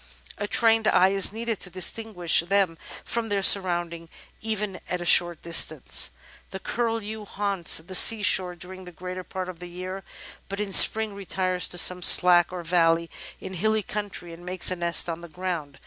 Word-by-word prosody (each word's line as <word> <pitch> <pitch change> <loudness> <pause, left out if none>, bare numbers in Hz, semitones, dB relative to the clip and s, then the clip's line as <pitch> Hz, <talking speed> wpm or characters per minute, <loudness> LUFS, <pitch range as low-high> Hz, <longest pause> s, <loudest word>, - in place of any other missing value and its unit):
A 205 - -4
trained 225 0 +1
eye 185 +1 +3
is 195 -1 +3
needed 225 0 -5
to - - -7
distinguish 185 -1 +1
them 190 0 0 0.3
from 230 -1 -4
their 200 -1 -2
surroundings, 175 -4 +1 0.3
even 210 -3 -5
at 180 - -3
a 175 - -7
short 175 -1 +2
distance. 160 -4 +1 0.4
The - - -8
Curlew 220 0 -4
haunts 200 -4 0
the 170 +4 -8
sea 215 +3 +6
shore 185 -3 0
during 185 +2 -12
the 180 - -12
greater 180 +2 -8
part 185 0 -7
of 180 -2 -10
the 180 - -10
year, 185 +2 -8 0.5
but 200 +1 -6
in 210 -1 -4
Spring 220 +1 +5
retires 185 -2 -3
to 175 - -3
some 180 +1 +4
slack 175 -1 +5
or 180 -1 -7
valley 165 -1 0 0.3
in 190 - -10
hilly 215 +4 -1
country, 205 -5 -7
and 170 +1 -14
makes 185 +1 -1
a - - -2
nest 170 -1 0
on 165 0 -6
the 170 - -12
ground. 160 -4 -6
185 Hz, 180 wpm, -24 LUFS, 175-205 Hz, 0.5 s, sea